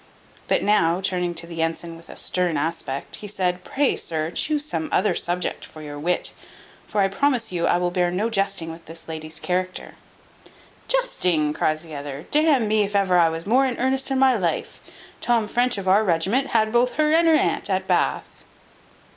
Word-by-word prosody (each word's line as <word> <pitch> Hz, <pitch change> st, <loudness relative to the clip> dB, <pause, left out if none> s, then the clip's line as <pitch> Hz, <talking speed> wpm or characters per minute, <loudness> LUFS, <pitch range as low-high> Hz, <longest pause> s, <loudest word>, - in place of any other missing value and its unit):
But -, -, +1 dB
now, 175 Hz, -4 st, +3 dB
turning 180 Hz, -2 st, -1 dB
to 165 Hz, 0 st, -1 dB
the 165 Hz, -1 st, -5 dB
ensign 165 Hz, +1 st, -3 dB
with 165 Hz, 0 st, -15 dB
a -, -, -9 dB
stern 180 Hz, -4 st, 0 dB
aspect, 145 Hz, -3 st, -3 dB
he 210 Hz, -, -8 dB
said, 180 Hz, -3 st, -1 dB
"Pray, 280 Hz, +6 st, 0 dB
sir, 160 Hz, 0 st, -2 dB
chuse 300 Hz, -, 0 dB
some 305 Hz, 0 st, -3 dB
other 210 Hz, -, +2 dB
subject 175 Hz, +1 st, -2 dB
for 155 Hz, -, -11 dB
your 145 Hz, -1 st, -7 dB
wit; 175 Hz, +4 st, 0 dB, 0.5 s
for 205 Hz, -, 0 dB
I 195 Hz, -, +4 dB
promise 245 Hz, +2 st, 0 dB
you 170 Hz, -2 st, 0 dB
I -, -, +3 dB
will 175 Hz, 0 st, 0 dB
bear 180 Hz, -1 st, +1 dB
no 190 Hz, +5 st, -1 dB
jesting 195 Hz, -5 st, 0 dB
with 165 Hz, +1 st, -12 dB
this 165 Hz, +1 st, -9 dB
lady's 155 Hz, -1 st, -5 dB
character." 185 Hz, 0 st, -3 dB, 0.9 s
"Jesting!" 180 Hz, -, +1 dB
cries 155 Hz, +1 st, 0 dB
the 160 Hz, -2 st, -10 dB
other, 145 Hz, +1 st, -6 dB
"d 305 Hz, +2 st, +3 dB
n 265 Hz, -8 st, +3 dB
me 215 Hz, 0 st, +2 dB
if 205 Hz, 0 st, -2 dB
ever 190 Hz, -3 st, +3 dB
I 165 Hz, -1 st, +5 dB
was 165 Hz, +1 st, -5 dB
more 260 Hz, +6 st, +3 dB
in 250 Hz, -, -3 dB
earnest 265 Hz, +2 st, +1 dB
in 270 Hz, -, 0 dB
my 260 Hz, -1 st, +4 dB
life. 175 Hz, -4 st, -2 dB, 0.4 s
Tom 230 Hz, -3 st, +2 dB
French 245 Hz, +1 st, +1 dB
of 195 Hz, -1 st, -5 dB
our 200 Hz, +3 st, +5 dB
regiment 195 Hz, +9 st, +1 dB
had 220 Hz, -1 st, +1 dB
both 240 Hz, +2 st, +2 dB
her 305 Hz, 0 st, +2 dB
and 330 Hz, +1 st, +4 dB
her 320 Hz, -, +6 dB
aunt -, -, +1 dB
at -, -, 0 dB
Bath." -, -, -1 dB
185 Hz, 200 wpm, -23 LUFS, 165-240 Hz, 0.9 s, her